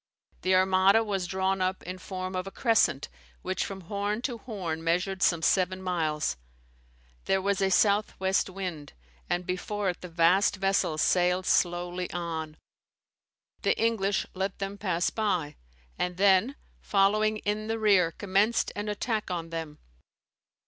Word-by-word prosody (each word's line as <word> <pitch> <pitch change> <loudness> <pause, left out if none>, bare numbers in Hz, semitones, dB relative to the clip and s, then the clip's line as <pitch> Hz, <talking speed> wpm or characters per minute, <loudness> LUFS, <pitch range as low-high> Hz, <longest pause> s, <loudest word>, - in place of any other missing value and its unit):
The 185 0 +2
Armada 190 +3 +4
was 195 -4 -2
drawn 190 +1 0
up 185 0 -1
in 185 +1 -6
form 185 -1 -5
of 185 +1 -3
a - - -6
crescent, 210 - +2 0.4
which 185 - -1
from 195 -1 -6
horn 205 +5 -3
to 240 -4 -3
horn 180 -10 -5
measured 180 +3 0
some 170 -2 +2
seven 185 +2 +2
miles. 160 - -1 0.9
There 195 - +2
was 200 +1 0
a 195 - +3
south 205 +2 +2
west 190 +1 +1
wind; 180 -6 -6 0.4
and 175 0 -1
before 190 +2 -2
it 175 - -14
the 180 - -8
vast 175 +5 +3
vessels 195 -5 +1
sailed 180 +1 +2
slowly 175 0 0
on. 160 -3 -4 1.0
The - - +1
English 210 -3 +1
let 190 +1 -3
them 195 0 -4
pass 180 -4 0
by; 185 -9 -1 0.4
and 180 0 -2
then, 200 +7 +4 0.2
following 215 +2 +2
in 210 +1 -2
the 225 0 -1
rear, 200 -6 +4
commenced 205 +6 +1
an 205 +1 -3
attack 215 0 -2
on 170 -2 -4
them. 160 -2 -5
190 Hz, 150 wpm, -28 LUFS, 175-200 Hz, 1.0 s, Armada